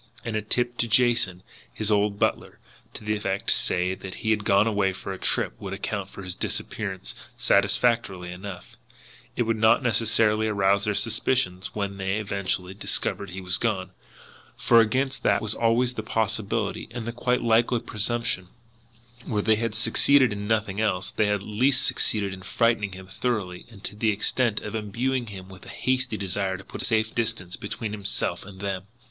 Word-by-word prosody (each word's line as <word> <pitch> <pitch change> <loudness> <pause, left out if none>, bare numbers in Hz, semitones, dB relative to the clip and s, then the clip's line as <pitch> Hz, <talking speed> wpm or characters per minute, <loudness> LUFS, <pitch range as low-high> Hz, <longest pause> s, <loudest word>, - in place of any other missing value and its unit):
And 115 - -2
a 110 - +1
tip 120 +3 -1
to 120 - +1
Jason, 115 -6 +3 0.3
his 110 - -1
old 105 0 +2
butler, - - -1 0.4
to - - -7
the 105 0 0
effect, 100 -2 0
say, 90 +1 +2
that 95 0 -8
he 110 - -1
had 105 -1 +1
gone 100 0 +4
away 100 -3 +1
for 95 +1 -6
a 95 - -8
trip, - - 0
would 95 -1 -5
account 100 -1 -3
for 100 - -10
his 90 -1 -4
disappearance 95 +1 -4 0.2
satisfactorily 100 -3 +2
enough; 90 0 -9 0.6
it 120 - +2
would 115 -1 0
not 110 +5 +4
necessarily 110 -2 +3
arouse 100 -1 +2
their 105 -1 0
suspicions 115 -4 0
when 100 -2 -2
they 95 0 -1
eventually 100 -3 -2
discovered 100 0 -2
he 95 +1 -6
was 90 -1 0
gone, 95 -5 -1 0.7
for 115 - +5
against 130 +5 0
that - - +3
was 110 -1 0
always 120 +2 +2
the 110 - -4
possible, 110 -1 0 0.2
and 120 0 -5
quite 125 +1 +1
likely 115 +1 +3
presumption 110 -3 -1 0.7
that, 120 - -18
where 105 -3 0
they 110 0 +4
had 115 -1 -2
succeeded 130 0 +4
in 100 0 -5
nothing 110 -2 0
else, 95 -4 0
they 105 - +1
had 105 - +2
at 100 - -5
least 125 +7 +2
succeeded 100 -3 0
in 95 - -9
frightening 110 0 +1
him 95 0 -9
thoroughly 95 -3 -3
and 105 -3 -15
to - - -5
the 110 +1 +1
extent 110 +2 +1
of 105 - -6
imbuing 120 +4 -1
him 95 -3 -8
with 95 -1 -13
a - - -9
hasty 130 -3 0
desire 95 -1 -1
to 95 - -12
put - - -5
a - - -1
safe 110 -2 +1
distance 110 -7 -2
between 105 +1 -5
himself 100 -1 -1
and 95 0 -11
them. 100 -1 -3
105 Hz, 185 wpm, -26 LUFS, 95-115 Hz, 0.7 s, for